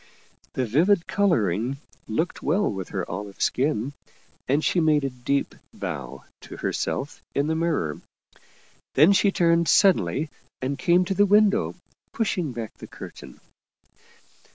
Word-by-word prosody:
The 130 Hz, -, 0 dB
vivid 165 Hz, -, +3 dB
coloring 120 Hz, -, +1 dB, 0.3 s
looked 160 Hz, +11 st, -2 dB
well 190 Hz, +8 st, +1 dB
with 95 Hz, -3 st, -5 dB
her -, -, -3 dB
olive 100 Hz, +3 st, -6 dB
skin, 135 Hz, -1 st, 0 dB, 0.5 s
and 140 Hz, +2 st, +1 dB
she 175 Hz, -, +2 dB
made 155 Hz, -3 st, +3 dB
a 135 Hz, -, -1 dB
deep 125 Hz, +3 st, -1 dB, 0.2 s
bow 70 Hz, 0 st, -6 dB, 0.2 s
to -, -, -11 dB
herself 140 Hz, +2 st, -3 dB
in 140 Hz, -, +2 dB
the 160 Hz, -, 0 dB
mirror. 160 Hz, -, -1 dB, 0.9 s
Then 155 Hz, +8 st, +7 dB
she 200 Hz, 0 st, +3 dB
turned 170 Hz, -2 st, +3 dB
sud 195 Hz, -3 st, +6 dB
denly 105 Hz, -, -2 dB, 0.3 s
and 135 Hz, +2 st, -3 dB
came 175 Hz, +1 st, +3 dB
to 195 Hz, -, -1 dB
the 205 Hz, +2 st, +4 dB
window, 210 Hz, +2 st, +3 dB, 0.4 s
pushing 180 Hz, -, -1 dB
back 115 Hz, -3 st, -7 dB
the -, -, -9 dB
curtain. -, -, -11 dB
150 Hz, 140 wpm, -25 LUFS, 120-180 Hz, 0.9 s, Then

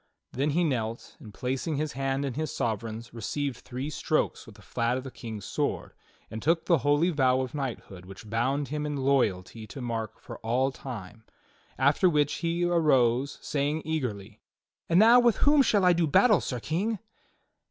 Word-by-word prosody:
Then 140 Hz, +4 st, 0 dB
he 170 Hz, +4 st, +2 dB
knelt 115 Hz, -7 st, -2 dB
and 110 Hz, -8 st, -11 dB
placing 130 Hz, +8 st, -3 dB
his 150 Hz, +1 st, -2 dB
hand 135 Hz, +1 st, -1 dB
in 135 Hz, -, -3 dB
his 155 Hz, +2 st, -3 dB
sovereign's 115 Hz, +1 st, -3 dB
received 125 Hz, +3 st, -3 dB
three 130 Hz, +4 st, -6 dB
strokes -, -, -1 dB
with -, -, -13 dB
the -, -, -17 dB
flat 115 Hz, +2 st, -1 dB
of 130 Hz, -, -5 dB
the 135 Hz, -, -8 dB
King's 110 Hz, -6 st, -8 dB
sword, -, -, -2 dB, 0.4 s
and 110 Hz, -, -5 dB
took 165 Hz, +1 st, +1 dB
the 170 Hz, -4 st, +3 dB
holy 145 Hz, +6 st, +2 dB
vow 130 Hz, -4 st, +2 dB
of 130 Hz, -1 st, -5 dB
knighthood 120 Hz, -10 st, -5 dB
which 95 Hz, +3 st, -11 dB
bound 130 Hz, +6 st, -1 dB
him 150 Hz, +1 st, -2 dB
in 145 Hz, -1 st, -3 dB
loyalty 115 Hz, -6 st, 0 dB
to 135 Hz, -, -9 dB
Mark 115 Hz, -3 st, -4 dB
for -, -, -10 dB
all 125 Hz, +4 st, 0 dB
time; 110 Hz, -5 st, -9 dB, 0.5 s
after 145 Hz, +7 st, +4 dB
which 150 Hz, -3 st, +2 dB
he 170 Hz, +1 st, 0 dB
arose 140 Hz, -7 st, +2 dB
saying 145 Hz, +2 st, -1 dB
eagerly: 110 Hz, -10 st, -4 dB, 0.5 s
"And 170 Hz, -, +3 dB
now 230 Hz, +3 st, +8 dB
with 240 Hz, -2 st, +4 dB
whom 290 Hz, 0 st, +5 dB
shall 205 Hz, -7 st, +3 dB
I 180 Hz, -, +6 dB
do 170 Hz, -1 st, +1 dB
battle. 210 Hz, -, +5 dB
Sir 125 Hz, -, -3 dB
King?" 185 Hz, -, -1 dB
135 Hz, 180 wpm, -28 LUFS, 115-155 Hz, 0.5 s, now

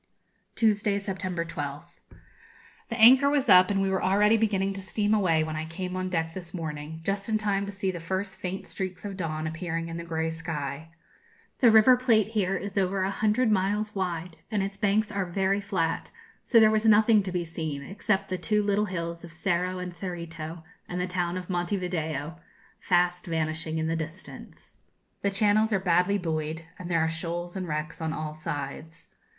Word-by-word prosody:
Tuesday, 210 Hz, -2 st, +2 dB
September 185 Hz, -3 st, -3 dB
12th. 145 Hz, +1 st, -6 dB, 0.9 s
The 230 Hz, -, -3 dB
anchor 260 Hz, +5 st, +8 dB
was 285 Hz, -1 st, +1 dB
up, 185 Hz, 0 st, +8 dB
and 195 Hz, -1 st, +1 dB
we 195 Hz, -, +1 dB
were 190 Hz, -, 0 dB
already 205 Hz, +3 st, +4 dB
beginning 200 Hz, -3 st, +1 dB
to 195 Hz, -, -6 dB
steam 205 Hz, +3 st, 0 dB
away 175 Hz, -7 st, +3 dB
when 155 Hz, 0 st, -4 dB
I 155 Hz, +1 st, -3 dB
came 180 Hz, +3 st, -5 dB
on 185 Hz, 0 st, -2 dB
deck 165 Hz, -2 st, -1 dB
this 180 Hz, -1 st, -8 dB
morning, 160 Hz, -1 st, -5 dB
just 200 Hz, +3 st, -2 dB
in 220 Hz, -, +2 dB
time 200 Hz, -2 st, 0 dB
to -, -, -4 dB
see 195 Hz, -1 st, -2 dB
the 175 Hz, -, -6 dB
first 190 Hz, +3 st, -3 dB
faint 190 Hz, +1 st, -4 dB
streaks 185 Hz, 0 st, -5 dB
of 200 Hz, -1 st, -4 dB
dawn 160 Hz, -4 st, -3 dB
appearing 165 Hz, +1 st, -3 dB
in 165 Hz, -, -5 dB
the 170 Hz, -, -5 dB
grey 160 Hz, -1 st, -2 dB
sky. 160 Hz, -2 st, -5 dB, 0.7 s
The 245 Hz, -, +7 dB
River 220 Hz, +3 st, +7 dB
Plate 225 Hz, -4 st, +3 dB
here 195 Hz, -4 st, 0 dB
is 200 Hz, +1 st, -2 dB
over 190 Hz, 0 st, +1 dB
a 190 Hz, -, 0 dB
hundred 215 Hz, +4 st, +2 dB
miles 210 Hz, +2 st, +1 dB
wide, 175 Hz, -3 st, -3 dB
and 210 Hz, -3 st, 0 dB
its 195 Hz, 0 st, -4 dB
banks 210 Hz, +1 st, +1 dB
are 200 Hz, -2 st, -1 dB
very 195 Hz, +2 st, 0 dB
flat; 185 Hz, -5 st, -1 dB, 0.3 s
so 235 Hz, -, +4 dB
there 215 Hz, -1 st, +6 dB
was 215 Hz, 0 st, +1 dB
nothing 215 Hz, 0 st, +6 dB
to 190 Hz, -1 st, -4 dB
be 175 Hz, -1 st, -1 dB
seen, 160 Hz, -4 st, -4 dB
except 195 Hz, +4 st, -1 dB
the 185 Hz, -1 st, -2 dB
two 210 Hz, -1 st, +1 dB
little 205 Hz, +1 st, +2 dB
hills 170 Hz, -3 st, -4 dB
of 170 Hz, -, -10 dB
Cerro 180 Hz, +2 st, -1 dB
and 180 Hz, -1 st, -5 dB
Cerrito 170 Hz, -2 st, -6 dB, 0.3 s
and 180 Hz, -, -3 dB
the 180 Hz, -, 0 dB
town 180 Hz, -1 st, -2 dB
of 180 Hz, -2 st, -6 dB
Monte 175 Hz, +2 st, -1 dB
Video, 160 Hz, -3 st, -3 dB, 0.4 s
fast 180 Hz, 0 st, +1 dB
vanishing 160 Hz, 0 st, -2 dB
in 160 Hz, -, -1 dB
the 165 Hz, +1 st, 0 dB
distance. 165 Hz, +3 st, -8 dB, 0.4 s
The 200 Hz, -, +1 dB
channels 210 Hz, +2 st, +3 dB
are 200 Hz, -, +2 dB
badly 180 Hz, +2 st, +2 dB
buoyed, 160 Hz, -2 st, -3 dB
and 180 Hz, -1 st, -6 dB
there 165 Hz, -2 st, +2 dB
are 160 Hz, -, +2 dB
shoals 170 Hz, +2 st, -4 dB
and 185 Hz, -2 st, -3 dB
wrecks 155 Hz, +1 st, -4 dB
on 160 Hz, -1 st, -1 dB
all 155 Hz, -1 st, -4 dB
sides. 155 Hz, +1 st, -6 dB
185 Hz, 195 wpm, -27 LUFS, 165-200 Hz, 0.9 s, anchor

